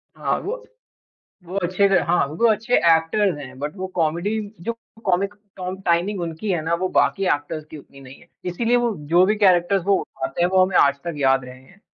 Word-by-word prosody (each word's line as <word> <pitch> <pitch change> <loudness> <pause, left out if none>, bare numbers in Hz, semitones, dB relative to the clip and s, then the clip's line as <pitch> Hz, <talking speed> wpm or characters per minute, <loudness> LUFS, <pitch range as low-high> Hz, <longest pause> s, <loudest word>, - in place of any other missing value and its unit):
हाँ, - - -1
वो 455 +5 -4 0.9
वो 180 +3 -7
अच्छे 185 +3 +2
थे 190 - +5
हाँ, 175 -3 +2
वो 160 +12 0
अच्छे 230 +3 -2
एक्टर्स 165 +3 +3
हैं, 135 -2 -10
बट 150 +6 -5
वो 190 0 -4
कॉमेडी 170 +4 0 0.3
जो 230 - -2 0.3
कॉमिक 195 +2 +1 0.2
टॉम 185 0 -5
टाइमिंग 180 +3 +1
उनकी 170 +5 -4
है 170 - 0
ना, 165 +1 0
वो 185 +2 -1
बाकी 195 - +2
एक्टर्स 150 +2 -6
की 155 - -11
उतनी 140 0 -16
नहीं 135 0 -13
है। - - -20 0.2
इसीलिए 230 +7 +1
वो 240 -2 +1 0.2
जो 175 +2 +6
भी 210 +2 +1
कैरेक्टर 190 -1 +4
वो 200 - +3
उठाते 130 +6 -4
हैं, 175 - +3
वो 185 0 +4
हमें 185 -1 -1
आज 140 0 +4
तक 170 -1 -4
याद 135 -2 +2
रहे 125 0 -11
हैं। 190 +9 -21
175 Hz, 210 wpm, -22 LUFS, 155-195 Hz, 0.9 s, जो